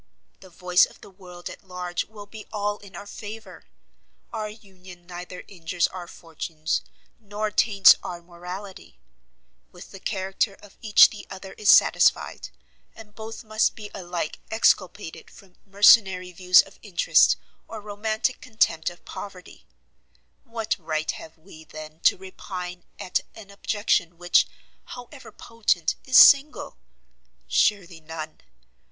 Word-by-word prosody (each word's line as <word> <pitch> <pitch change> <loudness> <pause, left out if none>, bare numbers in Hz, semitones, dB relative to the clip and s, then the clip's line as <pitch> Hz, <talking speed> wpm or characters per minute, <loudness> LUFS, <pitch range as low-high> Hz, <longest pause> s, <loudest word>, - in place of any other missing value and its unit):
The 190 - -15
voice 180 +1 +3
of - - -19
the - - -14
world 180 -2 -11
at - - -10
large 180 -2 -4
will 210 -1 -12
be 215 +1 -12
all 205 -1 -2
in 200 -1 -14
our 200 - -8
favour. 220 +2 -10 0.7
Our 215 -2 -3
union 185 -4 -15
neither 180 0 -9
injures 170 -2 -1
our 180 -2 -8
fortunes, 165 -1 -4 0.4
nor 210 0 -4
taints 200 -1 +6
our 175 - -6
morality; 180 +3 -10 0.7
with 180 - -13
the 195 - -10
character 195 +2 -2
of 205 -1 -18
each 215 -2 +7
the 210 - -10
other 190 0 -9
is 210 -2 -1
satisfied, - - +3 0.5
and 215 -2 -14
both 220 +1 -8
must 215 0 +1
be 210 -2 -9
alike 175 -4 -5
exculpated 205 -5 0
from 190 -2 -18
mercenary 195 -2 +5
views 180 0 +5
of 195 - -18
interest, 195 -5 +4 0.3
or 225 - -8
romantic 215 +4 -2
contempt 175 -9 0
of 175 - -16
poverty; 190 -3 -10 0.8
what 225 -2 -2
right 155 -1 -2
have 160 0 -11
we, 160 -1 -15
then, 155 0 -10
to - - +5
repine 180 -1 -8
at 180 - -1 0.2
an 205 -2 -12
objection 200 -4 -1
which, 175 0 +3 0.4
however 250 +3 -11
potent, 210 -8 -1
is 260 - +4
single? 285 +2 +6 0.7
Surely 180 -5 +1
none. 155 0 -8
190 Hz, 135 wpm, -25 LUFS, 175-210 Hz, 0.8 s, each